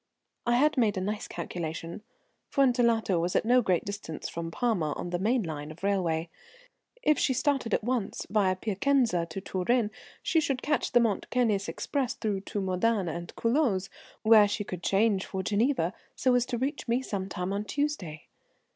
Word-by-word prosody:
"I 240 - +4
had 295 +4 +3
made 215 -4 +2
a - - +1
nice 210 +3 -3
calculation. 165 +2 -5 0.5
Fuentellato 235 - +3
was 175 +2 -1
at - - +2
no 250 +2 +5
great 185 -6 +1
distance 200 -6 -5
from 165 0 -5
Parma, 175 -7 0
on 175 - -5
the 175 - -1
main 225 +4 +2
line 150 -3 -5
of 155 +4 -12
railway. 175 -5 0 0.8
If 305 - +3
she 260 - +2
started 265 -3 0
at - - +1
once, 245 -3 -2
via 200 -3 +2
Piacenza 215 -2 +1
to 165 +4 -5
Turin, 210 +4 0 0.3
she 325 - +2
could 270 -4 -1
catch 295 0 0
the 245 - +7
Mont 225 -4 0
Cenis 220 -5 +1
express 270 -4 -2
through 205 -4 -2
to 205 - -4
Modane 190 -2 0
and 170 0 -6
Culoz, 230 -6 +1 0.3
where 215 -1 +7
she 205 +1 -2
could 180 -3 -6
change 195 +1 +2
for 190 -1 -3
Geneva, 210 - +1 0.2
so 255 - +2
as 245 0 +2
to 245 - -2
reach 270 +4 -3
me 240 +3 +1
some 195 -5 -3
time 180 +1 -3
on 200 +1 -1
Tuesday. 210 - -3
210 Hz, 180 wpm, -28 LUFS, 185-245 Hz, 0.8 s, the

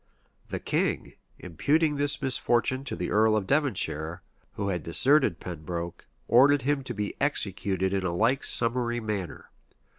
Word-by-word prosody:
The - - -3
king, - - -1 0.2
imputing 145 - 0
this 145 0 0
misfortune 130 0 +1
to - - -4
the 90 +1 -4
earl 110 +1 +4
of 105 -3 0
Devonshire, 95 - 0 0.3
who 100 -1 -3
had 90 -3 -2
deserted 130 - +3
Pembroke, 85 0 -6 0.2
ordered 135 +3 +5
him 140 0 0
to 120 - -5
be 105 0 -3
executed 100 -8 0
in 95 -1 0
a 90 - -1
like 115 +10 +1
summary 120 0 0
manner. 105 -5 -5
110 Hz, 145 wpm, -27 LUFS, 90-135 Hz, 0.3 s, ordered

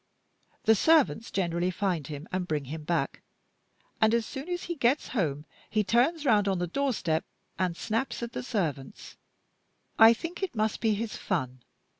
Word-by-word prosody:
The 220 - +6
servants 230 - +3
generally 175 -1 0
find 180 -6 -1
him 150 +2 -7
and 185 -1 -2
bring 150 -4 -1
him 155 +3 -6
back; 170 +1 -1 0.8
and 220 +1 +5
as 230 -1 0
soon 275 +7 -7
as 355 0 -2
he 345 - -3
gets 275 -2 +1
home 150 - -1 0.2
he 215 -1 +1
turns 260 - +2
round 210 -5 +4
on 190 -1 +1
the 175 - -1
doorstep 180 - 0 0.4
and 180 -2 0
snaps 230 +3 -2
at 235 - -4
the - - -4
servants. 160 - -4 0.8
I 225 0 +9
think 335 - -6
it 385 -9 -3
must 215 0 0
be 220 -2 +2
his 220 +1 -4
fun. 130 -9 -3
210 Hz, 170 wpm, -28 LUFS, 170-240 Hz, 0.8 s, I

